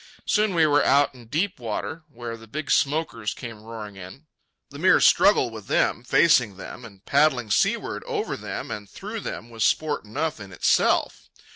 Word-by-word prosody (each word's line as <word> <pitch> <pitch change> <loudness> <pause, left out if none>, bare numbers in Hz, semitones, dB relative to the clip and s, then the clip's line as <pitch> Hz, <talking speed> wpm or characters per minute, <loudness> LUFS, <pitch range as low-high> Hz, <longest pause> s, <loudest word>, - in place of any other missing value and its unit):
Soon 210 -3 +1
we 165 -2 +5
were 145 -1 +3
out 140 +1 +3
in 120 -3 -15
deep 170 - -1
water 120 +7 -4
where 120 -3 -7
the 115 0 -14
big 150 +6 -4
smokers 140 -7 0
came 115 -3 -8
roaring 110 -2 -9
in. 95 - -11 0.5
The - - -9
mere - - +5
struggle - - +4
with - - -10
them, 120 - +1
facing 125 - +3
them 120 - -9
and 100 -3 -15
paddling 140 -6 +2
seaward - - 0
over - - -2
them - - -6
and 105 -2 -6
through 215 +3 -7
them, 120 - -7
was 115 -2 -2
sport 155 +4 +1
enough 145 +7 -3
in 100 -2 -10
itself. 95 - +1
120 Hz, 175 wpm, -24 LUFS, 110-155 Hz, 0.5 s, we